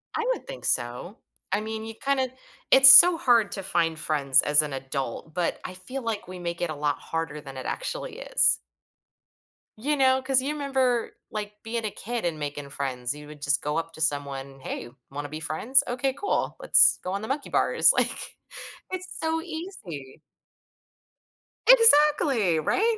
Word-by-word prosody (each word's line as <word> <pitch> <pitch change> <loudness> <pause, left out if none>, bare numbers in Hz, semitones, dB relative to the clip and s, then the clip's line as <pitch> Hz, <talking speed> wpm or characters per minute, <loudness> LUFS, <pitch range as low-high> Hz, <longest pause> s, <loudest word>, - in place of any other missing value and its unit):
I 455 - -2
would - - -11
think - - -9
so. 125 - 0 0.3
I 205 - 0
mean, 220 0 -6
you 225 - -8
kinda 265 -1 -2 0.4
it's 265 0 +9
so 345 +5 +9
hard 235 -7 +2
to 195 - -5
find 165 -4 -1
friends 140 -3 +3
as 150 +1 +5
an 145 -2 -6
adult, 135 +2 -6
but 175 -1 -3
I 185 - -7
feel 250 +9 -8
like 220 -4 -5
we 185 -1 -10
make 170 0 -6
it 175 - -2
a 155 - -5
lot 145 0 -2
harder 165 -2 -6
than 135 -2 -11
it 130 - -8
actually - - -5
is. - - +3 1.2
You 290 +7 -2
know, 260 -1 +2
'cause 260 -1 +2
you 290 +3 -3
remember, 265 -5 -2 0.2
like, 210 -1 -7
being 225 0 -5
a 210 - -3
kid 235 -3 -6
and 160 -3 -3
making 145 -1 -6
friends, 130 -2 -3
you 150 0 -12
would 150 -1 -14
just 145 0 +1
go 150 +2 -3
up 165 0 -5
to 160 - -10
someone, 140 -2 -2
"Hey, 120 - -7 0.2
wanna 145 +1 -7
be 155 +1 -7
friends? 225 - +2
Okay, 255 +2 -2
cool. 405 +9 -3
Let's - - +7
go 185 - -5
on 200 - -4
the 220 - -7
monkey 275 +2 -4
bars," - - +4
like, - - -2 0.5
it's 370 0 -6
so 320 0 -2
easy. 320 - -9 1.5
Exactly, 295 - +5
right? 440 - 0
195 Hz, 180 wpm, -24 LUFS, -, 1.5 s, it's